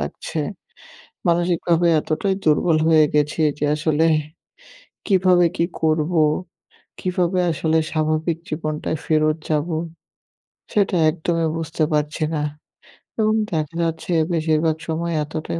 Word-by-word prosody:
লাগছে। - - -5 0.9
মানসিকভাবে 170 0 +2
এতটাই 180 +6 -1
দুর্বল 155 +1 +3
হয়ে 155 -2 +6
গেছি 150 +2 +1 0.2
যে - - -1
আসলে, 155 +1 +1 1.0
কিভাবে 185 -3 +4
কি 170 - +2 0.2
করবো? 160 +1 +2 0.8
কিভাবে 180 0 0
আসলে 160 +1 0
স্বাভাবিক 155 +1 0
জীবনটায় 155 0 -3
ফেরত 155 0 +2
যাবো? 155 +2 0 1.0
সেটা 200 -2 +2
একদমই 165 0 -1
বুঝতে 160 0 -2
পারছি 150 +1 -1
না, 150 - -1 0.8
এবং 215 0 +3 0.2
দেখা 155 0 -2
যাচ্ছে 165 +2 -3 0.2
বেশিরভাগ 160 0 +1
সময় 170 +1 -2
এতটাই 155 +2 -5
160 Hz, 110 wpm, -21 LUFS, 155-170 Hz, 1.0 s, হয়ে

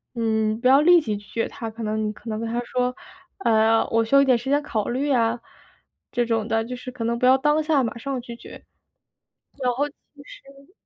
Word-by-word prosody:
嗯， 220 -1 0
不 250 - +3
要 270 +2 +7
立 345 +2 +6
即 215 -7 -3
拒 205 - -14
绝 230 - -2
他， 230 - -6
可 225 +1 -8
能 215 0 -2
可 225 +2 -11
能 215 - -3
跟 230 - -3
他 240 +1 -2
说， 250 +1 -1 0.4
呃， 225 - +3
我 225 0 +2
需 250 - +1
要 275 - +8
一 - - +3
点 255 -3 +4
时 255 +4 -6
间 290 +1 +2
考 225 -8 -2
虑 275 +4 -1
啊， 230 -2 +2 0.8
这 245 -2 +1
种 225 -2 -1
的 225 -1 0
就 250 +2 -6
是 250 - -8
可 245 -2 -6
能 235 +1 -1
不 250 - +1
要 260 +1 +6
当 295 +3 +2
下 300 -3 +2
马 235 0 -4
上 265 +1 -4
拒 235 -1 -9
绝。 - - -13 1.0
然 250 - +2
后 285 +4 0
就 290 - -20 0.3
是 275 +5 -16
240 Hz, 250 characters per minute, -23 LUFS, 225-275 Hz, 1.0 s, 要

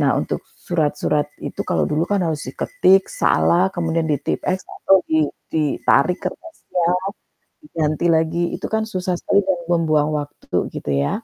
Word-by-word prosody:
Nah, - - +3
untuk - - -3 0.2
surat-surat 150 -3 0 0.2
itu, - - -5
kalau - - +1
dulu 155 +3 +1
kan 200 -2 +1
harus 160 -3 -2
diketik, 195 - +2
salah, 185 - +3
kemudian 165 -1 0
di-Tipp-X, 160 +5 -1
atau 195 -1 +2
di 155 -1 +3 0.2
ditarik 155 +3 +2
kertasnya, 185 - -3 0.8
diganti 155 - -1
lagi, 165 +1 +1
itu - - -5
kan 220 0 0
susah 185 -4 -2
sekali 200 +3 +2
dan 190 -2 +2
membuang 155 -3 +2
waktu 145 0 -3
gitu 75 - -3
ya, 70 - 0
170 Hz, 145 wpm, -21 LUFS, 155-185 Hz, 0.8 s, Nah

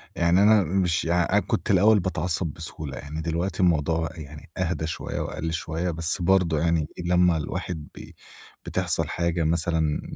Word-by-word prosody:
يعني 85 +3 +3
أنا 105 -2 +6
مش 90 -1 0
أنا 85 -1 +2
كنت - - -1
الأوّل 105 +3 +5
باتعصب 90 -1 -1
بسهولة 75 -3 -6
يعني، 75 +2 -6
دلوقتي 85 +4 -2
الموضوع 80 -2 +2
يعني 75 -1 -10
أهدى 80 -3 -1
شويّة - - -4
وأقل 80 +1 -4
شويّة، 80 +2 -2
بس 80 +2 -1
برضو 90 -3 +3
يعني، 80 -1 +1 0.2
لمّا 90 -1 +3
الواحد 75 +1 -4
بي - - -11 0.5
بتحصل - - 0
حاجة 85 -1 -1
مثلًا، 80 -1 0
85 Hz, 150 wpm, -25 LUFS, 80-90 Hz, 0.5 s, أنا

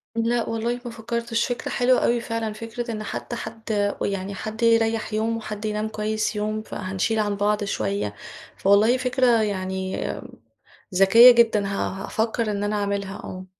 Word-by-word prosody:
لأ 230 +1 0
والله 230 +2 -1
ما 240 - -5
فكرتش 235 0 -2
فكرة 245 -2 -3
حلوة 250 +1 +3
أوي 235 0 +2
فعلًا 230 -2 -3
فكرة 230 +2 -5
إن 215 -1 -4
حتّى 240 - -5
حد 220 -3 -2
ويعني 195 0 -2
حد 220 +4 -5
يريح 225 -1 +2
يوم 225 +1 0
وحد 215 -1 -6
ينام 215 0 -1
كويّس 215 0 -2
يوم 215 +1 -2
فهنشيل 195 +2 -2
عن 205 -1 0
بعض 205 +1 +1
شويّة، 100 - -2 0.4
فوالله 210 +5 +4
فكرة 250 -2 +2
يعني 190 -2 -2 0.9
ذكيّة 225 +7 +9
جدًا 225 -4 +3
ه - - -3 0.4
هافكر 225 0 -1
إن 200 0 -2
أنا 205 +1 -1
أعملها 200 -1 -2
آه. 185 0 -8
215 Hz, 155 wpm, -24 LUFS, 205-230 Hz, 0.9 s, ذكيّة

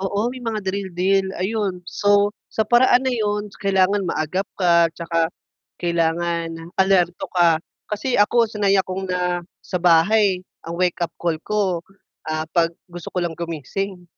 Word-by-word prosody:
Oo, 200 +4 0
may 250 -1 -7
mga 220 -2 -2
drill 190 -1 -3
deal 190 +2 +2
ayun. 195 -2 -1
So, 205 0 +3 0.2
sa 220 -1 0
paraan 245 +1 +5
na 265 - -1
'yun 210 -2 -1
kailangan 195 0 +2
maagap 175 +3 -1 0.2
ka, 170 -2 +4
'tsaka 165 -1 -1 0.5
kailangan 170 0 0 0.2
alerto 185 -2 +2
ka. 170 -3 +4 0.3
Kasi 215 +5 -2
ako 230 +3 +4
sanay 205 -3 +1
akong 190 0 -2
na 180 -1 0 0.2
sa 180 - -3
bahay 180 +3 +4 0.2
ang 170 - -4
wake-up 175 -1 0
call 165 -2 -2
ko, 195 -4 0 0.5
ah, 155 0 -1
'pag 165 -1 +1
gusto 175 -2 -9
ko 180 -1 -2
lang 170 - -2
gumising, 170 +4 -5
185 Hz, 150 wpm, -22 LUFS, 170-205 Hz, 0.5 s, paraan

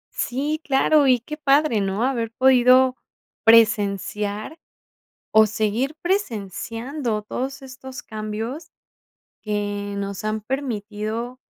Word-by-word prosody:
Sí, 290 +5 -2
claro, 280 +1 +3
y 250 -2 +4
qué 300 +6 -8
padre, 285 -6 +3
¿no? 195 +3 -1
Haber 235 -4 -1
podido 255 +1 +5 0.5
presenciar, 210 - +2 0.7
o 220 0 +6
seguir 220 +6 -1
presenciando 235 - -2
todos 265 +6 -4
estos 265 0 -10
cambios 220 +7 -5 0.7
que 205 -1 -3
nos 200 0 -5
han 215 0 -1
permitido 225 -1 -4
230 Hz, 100 wpm, -22 LUFS, 210-265 Hz, 0.7 s, o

